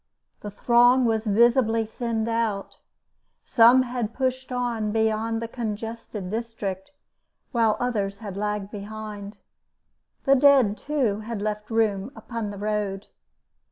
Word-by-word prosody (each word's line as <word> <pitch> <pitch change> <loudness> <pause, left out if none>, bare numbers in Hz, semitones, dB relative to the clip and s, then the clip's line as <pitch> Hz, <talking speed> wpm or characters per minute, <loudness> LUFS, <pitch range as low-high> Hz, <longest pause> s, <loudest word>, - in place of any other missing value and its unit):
The 205 - -7
throng 245 +4 +4
was 225 -1 0
visibly 230 +1 +3
thinned 225 0 -3
out; 225 -4 -2 0.6
some 240 +2 +6
had 240 -3 -4
pushed 260 0 -2
on 240 -4 -1
beyond 220 +1 0
the - - -3
congested 225 -4 -5
district, 220 -3 -4 0.6
while 225 -4 +2
others 205 -5 -1
had 205 -4 -7
lagged 210 0 -3
behind. 210 0 -7 0.9
The 275 - +5
dead, 270 -6 +5
too, 255 -7 -1
had 220 0 -5
left 210 0 -3
room 220 -1 0
upon 230 -3 -5
the 205 - -7
road. 205 -1 -3
225 Hz, 120 wpm, -25 LUFS, 210-235 Hz, 0.9 s, some